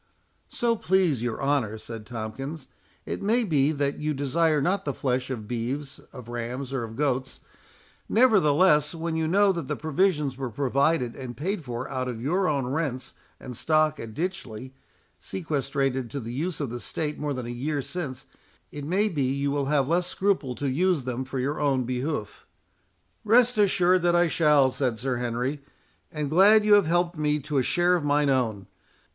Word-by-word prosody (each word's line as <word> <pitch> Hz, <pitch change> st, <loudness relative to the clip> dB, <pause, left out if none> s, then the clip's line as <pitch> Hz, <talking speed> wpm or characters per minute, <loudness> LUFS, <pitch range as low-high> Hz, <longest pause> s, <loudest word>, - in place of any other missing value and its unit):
"So 235 Hz, -1 st, 0 dB
please 180 Hz, -, +1 dB
your 120 Hz, -2 st, -2 dB
honour," 135 Hz, -7 st, 0 dB
said 110 Hz, -1 st, -9 dB
Tomkins, 130 Hz, +6 st, -6 dB, 0.4 s
"it -, -, -4 dB
may 230 Hz, +5 st, +2 dB
be 150 Hz, -7 st, +2 dB
that 140 Hz, -2 st, -1 dB
you 150 Hz, 0 st, -1 dB
desire 150 Hz, +3 st, +1 dB
not 190 Hz, +7 st, 0 dB
the 140 Hz, -, -3 dB
flesh 125 Hz, -1 st, -1 dB
of 115 Hz, -5 st, -5 dB
beeves, 130 Hz, +5 st, -4 dB
of 125 Hz, -4 st, -11 dB
rams, 120 Hz, +3 st, -5 dB
or 130 Hz, -3 st, -1 dB
of 115 Hz, -1 st, -7 dB
goats. 135 Hz, -1 st, -1 dB, 0.7 s
Nevertheless, 180 Hz, -, +4 dB
when 165 Hz, 0 st, -3 dB
you 160 Hz, -1 st, 0 dB
know 200 Hz, +4 st, +4 dB
that 170 Hz, -7 st, -4 dB
the -, -, -2 dB
provisions 155 Hz, -4 st, 0 dB
were 130 Hz, -2 st, -3 dB
provided 140 Hz, +1 st, +1 dB
and 130 Hz, -3 st, -7 dB
paid 185 Hz, +4 st, -2 dB
for 125 Hz, -1 st, -5 dB
out 130 Hz, -1 st, -3 dB
of 120 Hz, -3 st, -4 dB
your 180 Hz, +10 st, 0 dB
own 140 Hz, -4 st, 0 dB
rents 135 Hz, -1 st, -3 dB, 0.3 s
and 125 Hz, -, -8 dB
stock 155 Hz, +2 st, +2 dB
at 110 Hz, -1 st, -8 dB
Ditchley, 130 Hz, -, -5 dB, 0.5 s
sequestrated 135 Hz, -6 st, -2 dB
to 140 Hz, -, -4 dB
the 115 Hz, -1 st, -6 dB
use 165 Hz, +6 st, -3 dB
of 140 Hz, -6 st, -3 dB
the 120 Hz, -, -5 dB
state 150 Hz, +4 st, -3 dB
more 145 Hz, -1 st, -2 dB
than 125 Hz, -2 st, -5 dB
a -, -, -6 dB
year 140 Hz, +5 st, -2 dB
since, 140 Hz, -8 st, -5 dB, 0.5 s
it 145 Hz, -, -7 dB
may 190 Hz, +8 st, +1 dB
be 165 Hz, -9 st, -2 dB
you 140 Hz, +2 st, 0 dB
will 140 Hz, -1 st, 0 dB
have 140 Hz, -2 st, +1 dB
less 175 Hz, +3 st, +1 dB
scruple 185 Hz, -11 st, 0 dB
to 140 Hz, -, -3 dB
use 165 Hz, +2 st, +1 dB
them 130 Hz, +1 st, -3 dB
for 135 Hz, +1 st, -5 dB
your 140 Hz, +4 st, -1 dB
own 135 Hz, -3 st, +2 dB
behoof." 125 Hz, -1 st, -4 dB, 0.8 s
"Rest 240 Hz, +3 st, +4 dB
assured 185 Hz, -2 st, +4 dB
that 175 Hz, 0 st, +2 dB
I 175 Hz, 0 st, +4 dB
shall," 150 Hz, -5 st, +4 dB
said 125 Hz, -4 st, -1 dB
Sir 125 Hz, +2 st, -2 dB
Henry; 125 Hz, +4 st, -2 dB, 0.5 s
"and 150 Hz, -2 st, -3 dB
glad 205 Hz, +5 st, +6 dB
you 210 Hz, -, +5 dB
have 205 Hz, -5 st, +5 dB
helped 175 Hz, 0 st, +1 dB
me 150 Hz, 0 st, +1 dB
to 145 Hz, 0 st, -1 dB
a -, -, +3 dB
share 175 Hz, +7 st, +2 dB
of 170 Hz, -, -1 dB
mine 145 Hz, -1 st, +2 dB
own. 110 Hz, -7 st, 0 dB
145 Hz, 185 wpm, -26 LUFS, 130-170 Hz, 0.8 s, glad